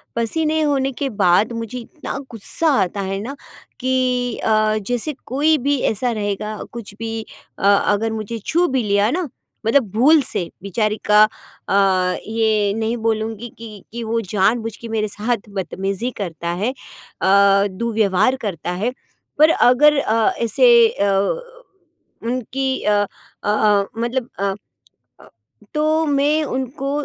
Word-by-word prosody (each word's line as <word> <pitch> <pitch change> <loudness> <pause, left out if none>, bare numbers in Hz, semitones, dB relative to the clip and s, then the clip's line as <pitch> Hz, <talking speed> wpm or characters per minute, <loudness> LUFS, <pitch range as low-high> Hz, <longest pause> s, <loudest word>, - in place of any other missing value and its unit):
पसीने 310 +7 0
होने 275 -3 +1
के 280 - -1
बाद 185 +5 +4
मुझे 230 +1 -5
इतना 275 +4 -7
गुस्सा 230 +9 -2
आता 190 +2 -1
है 195 0 -3
ना 260 +6 -6 0.4
कि 250 -2 0
अ, 215 0 +2
जैसे 245 +5 -1
कोई 300 +5 +2
भी 285 +1 0
ऐसा 235 +3 -1
रहेगा 210 0 -3
कुछ 230 -4 -8
भी 225 0 -3 0.4
अ, - - -7
अगर 205 +2 +3
मुझे 220 +1 -4
छू 345 +2 +2
भी 260 -2 0
लिया 205 0 +2
ना, 355 0 -1 0.4
मतलब 230 -1 +3
भूल 285 +9 +5
से 175 -9 -2
बेचारी 215 +2 -1
का 210 0 +6 0.5
अ, 190 -2 +2
ये 220 -2 +1
नहीं 225 +2 -1
बोलूँगी 225 +1 -2
कि 215 -4 -10
कि 235 +1 -5
वो 230 +1 -1
जानबूझ 220 +3 0
के 230 - -9
मेरे 220 -1 0
साथ 210 +1 -3
बदतमीजी 195 +4 -3
करता 170 -2 -4
है 245 - +1 0.5
अ, 200 +1 +5
दुर्व्यवहार 215 +3 +1
करता 175 -3 -3
है। 200 +7 -1 0.5
पर 310 +1 +7
अगर 295 +2 +5
अ, 225 -3 +2
ऐसे 470 - +5
अ, 200 - 0 1.1
उनकी 255 +2 -2
अ 210 - +2 0.5
अ - - -4
अ, 210 -1 +3
मतलब 240 +1 -2
अ 200 - -1 0.8
अ, - - -16 0.5
तो 310 +1 +2
मैं 290 +2 +2
उनको 265 0 -3
225 Hz, 140 wpm, -20 LUFS, 205-260 Hz, 1.1 s, पर